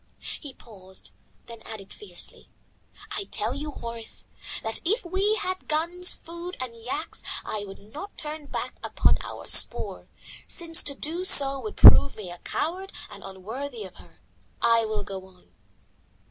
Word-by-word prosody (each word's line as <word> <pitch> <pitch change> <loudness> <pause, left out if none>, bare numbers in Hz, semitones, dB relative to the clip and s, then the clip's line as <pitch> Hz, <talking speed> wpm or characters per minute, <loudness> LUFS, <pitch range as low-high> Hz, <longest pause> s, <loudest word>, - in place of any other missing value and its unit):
He 280 -3 -9
paused, 190 -4 -14 0.3
then 230 -1 -11
added 210 -3 -10
fiercely, 420 - -9 0.6
"I 400 - -3
tell - - -2
you, 300 +2 -5
Horace, 230 -5 -5 0.4
that 225 0 0
even 365 +6 +3
if 470 - -11
we 385 +4 +1
had 370 -3 -4
guns, 340 +4 +2
food, 340 +2 -8
and 255 -3 -5
yaks, 255 +8 -6 0.2
I 205 -1 -3
would 195 - -10
not 295 - -10
turn 300 -1 -4
back - - -5
upon - - +2
our - - -8
spoor, - - +4 0.4
since 335 -1 +3
to 280 - 0
do 330 +6 -1
so 275 -6 +8
would 430 - -7
prove 280 - +9
me 190 -5 -8
a 175 - -10
coward 370 +5 -3 0.2
and - - -11
unworthy 220 +6 -7
of 190 -2 -11
her. - - -16 0.4
I 230 -1 +4
will 215 -1 -3
go 190 -1 -8
on." 185 -1 -24
275 Hz, 160 wpm, -26 LUFS, 215-340 Hz, 0.6 s, prove